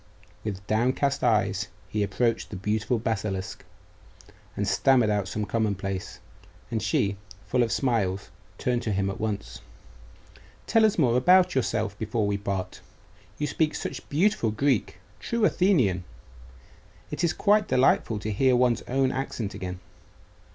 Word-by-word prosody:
With 100 -2 -5
downcast 130 +6 +1
eyes 105 -5 +2 0.2
he 105 - -2
approached 115 +3 0
the - - -7
beautiful 110 +5 -1
basilisk, 105 -4 -3 0.9
and 100 - -1
stammered 115 +3 +3
out 100 -2 0
some 105 +2 -3
commonplace; 100 -4 -2 0.5
and 110 -2 -1
she, 105 -4 0 0.3
full 125 - +1
of 115 -2 +1
smiles, 100 -7 0 0.3
turned 125 -1 0
to 110 - -2
him 100 0 0
at - - -8
once. 100 - -4 1.0
'Tell 225 -1 +4
us 215 - +2
more 125 -7 +3
about 180 +7 +5
yourself 110 -5 -1
before 110 0 -1
we 100 0 0
part. 100 -2 -4 0.6
You 150 - -1
speak 155 +1 0
such - - -6
beautiful 160 - +2
Greek 125 +1 0 0.2
true 235 -2 0
Athenian. 130 - +2 1.1
It - - -3
is 170 - +3
quite 210 0 +2
delightful 125 -3 +2
to 110 - -3
hear 130 +5 +3
one's 125 -1 +2
own 130 +1 +1
accent 125 -5 -3
again. 90 0 -6
110 Hz, 140 wpm, -26 LUFS, 100-130 Hz, 1.1 s, about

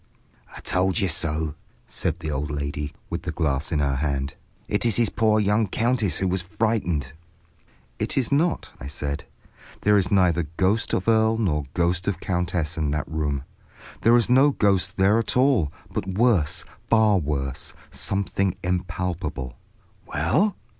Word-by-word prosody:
"I - - -9
told 90 +1 +1
you 100 -4 +2
so," 80 -2 0 0.3
said 85 +2 -2
the 80 -1 -3
old 70 +1 -2
lady, 75 0 -3 0.2
with - - -2
the - - -4
glass 75 -3 0
in 80 - +1
her 70 -2 +1
hand. 70 -1 -1 0.3
"It - - 0
is 115 -4 +2
his 115 -3 +2
poor 110 -1 +2
young 105 +1 +2
countess 115 - +1
who 95 - 0
was 95 0 0
frightened—" 90 - -1 0.9
"It - - -2
is 130 -5 +1
not," 160 +5 +1
I 65 - -7
said. 70 +1 -4 0.6
"There 105 0 +4
is 90 - 0
neither 90 -5 +3
ghost 100 +4 +1
of 95 - -2
earl 110 0 +4
nor 75 -10 0
ghost 90 +1 +1
of 100 -4 -1
countess 85 -4 -1
in 75 -2 0
that 75 0 -2
room; 75 -2 -2 0.6
there 115 +2 +6
is 120 - +2
no 130 +4 +6
ghost 100 -6 +1
there 100 +4 +4
at 115 - -1
all, 125 - +3 0.2
but - - -2
worse, 110 -10 +2 0.2
far 110 -3 +5
worse, 70 -4 -3 0.2
something 95 -1 -1
impalpable—" 90 -7 -3 0.5
"Well?" 140 - +1
90 Hz, 160 wpm, -24 LUFS, 75-110 Hz, 0.9 s, there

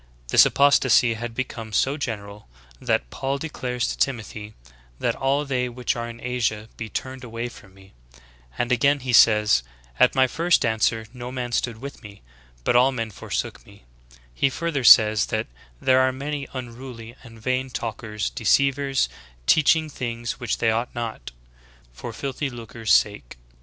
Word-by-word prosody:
This - - +7
apostasy 130 -4 +4
had 115 +1 -6
become 115 -3 -5
so 135 +7 +1
general 105 - -6 0.3
that - - 0
Paul 135 +1 -2
declares 125 -5 -3
to - - -4
Timothy, 110 -4 -3 0.4
'that - - 0
all 140 +2 0
they 125 -3 -1
which 125 0 -2
are 120 0 -4
in 115 0 -10
Asia 115 -3 -2
be 115 -1 -6
turned 130 +3 -5
away 120 0 -5
from 95 -5 -16
me 95 0 -18 0.3
;' - - -27
and 120 +1 -1
again 140 +4 +3
he 125 -1 -3
says, 105 - +6 0.4
'at - - +5
my 130 -1 +5
first 165 +3 +2
answer 110 0 +1
no 125 0 -7
man 125 -2 -4
stood 120 -1 -1
with 140 +1 -8
me, 100 -1 -13 0.4
but - - +1
all 125 +2 +5
men 115 -4 -4
forsook - - -4
me - - -18 0.3
;' - - -22
he 135 - +2
further 160 -2 -2
says 110 -2 +7
that - - -1 0.3
'there 130 0 +4
are 130 0 +3
many 140 +2 -4
unruly, 120 -2 -8
and 115 -3 -14
vain 130 +3 -1
talk 115 -3 -5
ers, 105 - -3
deceivers, 135 - +2 0.4
teaching 155 - +4
things 120 -4 -5
which 120 -4 -2
they 115 - +2
ought 115 +3 -2
not, 115 - -5 0.6
for 115 - -7
filthy 135 +4 -4
lucre's 115 -2 -5
sake.' 100 -15 +2
120 Hz, 170 wpm, -24 LUFS, 110-130 Hz, 0.6 s, This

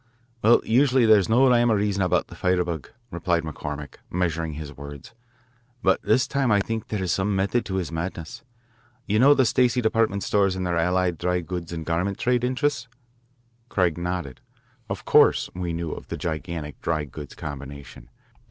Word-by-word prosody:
"Well, 115 +3 +5
usually 130 +1 +4
there 110 -1 +7
is 95 - -2
no 125 +4 +5
rhyme 120 -1 +4
or - - +4
reason 100 -1 0
about 90 -1 +2
the - - -13
firebug," 90 -3 -1 0.2
replied 85 -1 0
McCormick, 75 -2 -6
measuring 85 -3 -1
his 75 -1 -8
words, 70 +9 -10 0.7
"but - - +3
this 130 - +2
time 140 -3 0
I 105 - +4
think 110 +2 -3
there 105 -3 -3
is 90 - -1
some 95 +3 0
method 100 +5 0
in 95 - -2
his 90 -4 -2
madness. 80 -1 -5 0.6
You 105 +1 +1
know 140 +4 +7
the 130 - +3
Stacey 125 +1 +2
department 110 -4 +1
stores 100 -2 +2
and 95 -1 -3
their 90 -1 0
allied 90 +1 +1
dry 90 0 0
goods 85 0 -6
and 80 -2 -5
garment 90 +5 -1
trade 125 0 +1
interests? 130 0 0 0.8
Craig 90 -5 +1
nodded. 85 -6 -4 0.5
Of - - -5
course - - +4
we 90 -1 -3
knew 85 -1 -3
of - - -8
the - - -5
gigantic 80 -2 -5
dry 80 -2 -1
goods 75 +1 -10
combination. 70 -2 -8
90 Hz, 180 wpm, -24 LUFS, 80-110 Hz, 0.8 s, there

